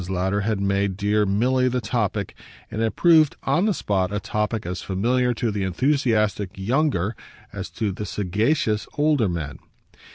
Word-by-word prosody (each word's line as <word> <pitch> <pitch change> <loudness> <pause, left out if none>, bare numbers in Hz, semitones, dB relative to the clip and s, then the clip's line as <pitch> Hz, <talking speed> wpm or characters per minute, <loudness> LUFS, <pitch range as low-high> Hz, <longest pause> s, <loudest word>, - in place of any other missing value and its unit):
Lowder 95 +2 0
had 105 0 -1
made 100 -1 0
dear 105 +1 +1
Milly 125 +6 +2
the 125 0 0
topic, 105 -5 -2 0.4
and 110 - -3
it 115 -1 0
proved, 160 -4 +5
on 170 +9 +2
the - - +3
spot, 95 -2 0
a 105 - -1
topic 105 0 -2
as 90 +1 -4
familiar 125 +6 +1
to 115 -1 -1
the 100 -1 -3
enthusiastic 110 - +1
younger 115 - 0 0.4
as - - -5
to 105 -3 -2
the 105 +2 -5
sagacious 105 - 0
older 145 -8 +3
man. 75 -5 -4
105 Hz, 160 wpm, -23 LUFS, 100-125 Hz, 0.4 s, proved